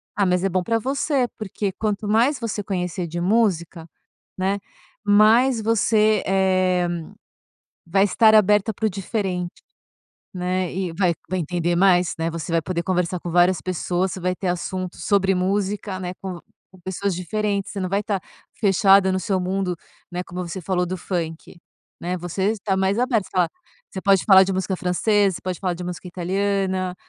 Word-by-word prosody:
Ah, 200 - +2
mas 180 0 +1
é 195 - +2
bom 185 0 0
para 230 +2 0
você, 270 +1 0
porque 205 -1 -3
quanto 210 -1 -2
mais 240 +6 +3
você 215 -3 -3
conhecer 180 -2 -3
de 170 +2 -4
música, 175 -5 0 0.5
né, 195 +2 0 0.5
mais 220 +4 +5
você, 215 -1 +2
eh, 185 -2 +2 1.0
vai 195 +4 +3
estar 220 +2 +4
aberta 210 +1 +4
para 220 +2 -2
o 215 - +1
diferente, 185 -2 -3 0.7
né. 180 0 -1
E 185 -2 -3
vai 180 -1 +2 0.2
vai 185 +1 -1
entender 175 +1 -1
mais, 180 -2 +4
né, 165 +1 -1
você 165 -1 -5
vai 165 -1 +2
poder 170 0 -2
conversar 180 -1 -1
com 175 - -5
várias 175 +1 +3
pessoas, 185 +1 -1
você 190 - -6
vai 180 +1 0
ter 185 0 -3
assuntos 180 +1 -4
sobre 195 -2 +2
música, 195 +1 -1
né, 180 0 -4
com 185 -3 -6 0.3
com 185 - -16
pessoas 190 +2 -2
diferentes. 200 +3 -2
Você 205 - -6
não 185 - -2
vai 200 - +1
estar 205 -1 -1 0.4
fechada 195 -1 +4
no 185 - 0
seu 190 -1 0
mundo, 185 -1 -1 0.3
né. 180 +1 -3
Como 180 +1 -6
você 190 - -5
falou 180 0 0
do 185 +2 -3
funk, 170 -1 -5 0.4
né, 180 +1 -2
você 180 +3 -1
está 200 -3 -2
mais 190 +3 +1
aberta, 240 -5 +1
você - - -30
fala 180 -2 +2 0.4
você 190 - -6
pode 195 -1 +3
falar 190 -2 +8
de 190 0 0
música 190 0 -1
francesa, 195 +2 +1
você - - -9
pode 185 -1 -4
falar 180 -3 -1
de 180 +1 -7
música 180 0 -6
italiana 190 +1 -1
190 Hz, 180 wpm, -22 LUFS, 180-205 Hz, 1.0 s, falar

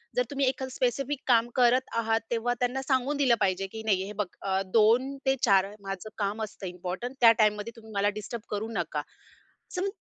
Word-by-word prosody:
जर - - +3
तुम्ही 275 -1 +1
एखादं 260 0 -1
स्पेसिफिक 260 +3 -1
काम 235 -2 +4
करत 250 +1 +3
आहात, 225 -1 +2
तेव्हा 240 +1 +1
त्यांना 250 +2 0
सांगून 265 +1 0
दिलं 260 -4 +4
पाहिजे, 190 0 +1
की 220 - -6
नाही 195 -4 +1
हे 205 - -7
बघ, 210 - +2 0.2
अ, 190 -1 0
2-4 240 -3 +3 0.2
माझं 195 +2 -5
काम 210 +1 -1
असतं 200 -2 -6
इम्पोर्टंट 180 +8 -5
त्या 230 -1 +9
टाईममध्ये, 210 +1 +2
तुम्ही 220 -1 -13
मला 200 +1 +3
डिस्टर्ब 230 +2 -6
करू 210 +2 -3
नका. 160 -5 -2 0.7
सम 370 +2 0
225 Hz, 180 wpm, -28 LUFS, 205-260 Hz, 0.7 s, त्या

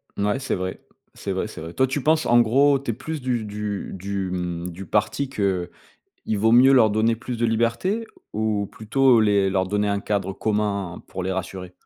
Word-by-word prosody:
Mouais 105 +5 0
c'est 135 - -2
vrai. 95 0 -4 0.3
C'est - - -5
vrai, - - -1
c'est - - -9
vrai. 80 +1 -7
Toi 130 +5 +2
tu 135 +2 -2
penses, 155 +3 +2
en 120 0 +5
gros, 135 +5 +4
tu 135 -3 -3
es - - -4
plus 150 +5 -6
du 125 -3 -1
du 105 -1 -4
du 95 0 -3
mmh, 90 -1 -3
du 95 +3 -8
parti 140 - 0
qu'il 95 -8 -1 0.7
vaut 110 +2 +3
mieux 130 +3 +7
leur 120 -5 +6
donner 110 +2 +2
plus 120 +2 -5
de 120 - +2
liberté 115 - 0 0.3
ou 105 -1 0
plutôt 125 +2 +3
les 100 -2 +3
leur 95 -1 +1
donner 105 +2 0
un 100 0 0
cadre 100 -2 -1
commun 100 -3 -2
pour 95 - -5
les 95 +1 -2
rassurer? 95 0 -5
105 Hz, 200 wpm, -23 LUFS, 95-120 Hz, 0.7 s, mieux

